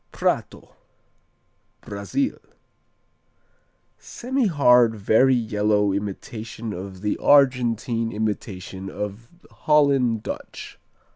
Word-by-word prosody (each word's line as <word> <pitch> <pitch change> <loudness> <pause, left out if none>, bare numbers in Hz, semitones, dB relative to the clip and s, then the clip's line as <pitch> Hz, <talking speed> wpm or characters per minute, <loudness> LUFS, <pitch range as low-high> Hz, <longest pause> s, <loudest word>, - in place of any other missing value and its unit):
Prato - - -2 1.1
Brazil 100 - -3 1.6
Semihard, 145 - +2
very 110 +6 +3
yellow 105 -3 +1
imitation 110 +2 -5
of 95 0 -8
the 105 - -1
Argentine 120 -5 +2
imitation 95 -3 -4
of 105 +4 -6 0.2
Holland 140 -7 +2
Dutch. - - -8
115 Hz, 70 wpm, -23 LUFS, 105-125 Hz, 1.6 s, very